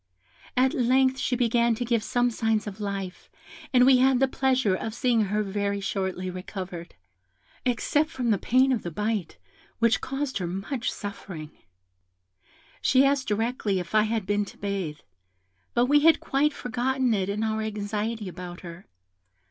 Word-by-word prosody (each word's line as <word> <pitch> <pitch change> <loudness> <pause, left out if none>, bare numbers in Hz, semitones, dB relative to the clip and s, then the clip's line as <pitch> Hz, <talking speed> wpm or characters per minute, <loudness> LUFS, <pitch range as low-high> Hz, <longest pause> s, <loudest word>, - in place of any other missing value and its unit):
At 260 +1 +4
length 260 +1 +3
she 250 - 0
began 235 -1 +2
to 245 - -3
give 235 -1 +1
some 245 +2 +1
signs 225 -2 0
of 205 0 -7
life, 195 -2 -5 0.4
and 250 -1 +6
we 260 -1 +6
had 260 0 +4
the 270 - +4
pleasure 260 -6 +1
of 220 +4 -3
seeing 240 -4 +2
her 210 +2 0
very 200 0 -2
shortly 190 -2 -2
recovered, 180 -1 -7 0.7
except 290 +5 +1
from 245 -6 -1
the 200 - +2
pain 260 +2 +3
of 240 -5 +1
the 175 - -4
bite, 210 +1 -2 0.4
which 230 -1 +2
caused 270 -3 -3
her 180 - -2
much 195 +8 -3
suffering. 185 -6 -7 1.3
"She 265 +1 +4
asked 275 -1 +1
directly 215 -1 0
if 175 +1 -7
I 215 - +6
had 225 -3 -1
been 205 +1 +1
to - - -13
bathe: 195 -7 -3 0.7
but 240 - +4
we 290 +3 +5
had 320 +2 +5
quite 285 +2 +1
forgotten 250 0 0
it 195 -2 0
in 210 +2 -1
our 220 0 -1
anxiety 215 0 -3
about 180 0 -8
her. 170 +1 -10
220 Hz, 165 wpm, -26 LUFS, 195-255 Hz, 1.3 s, and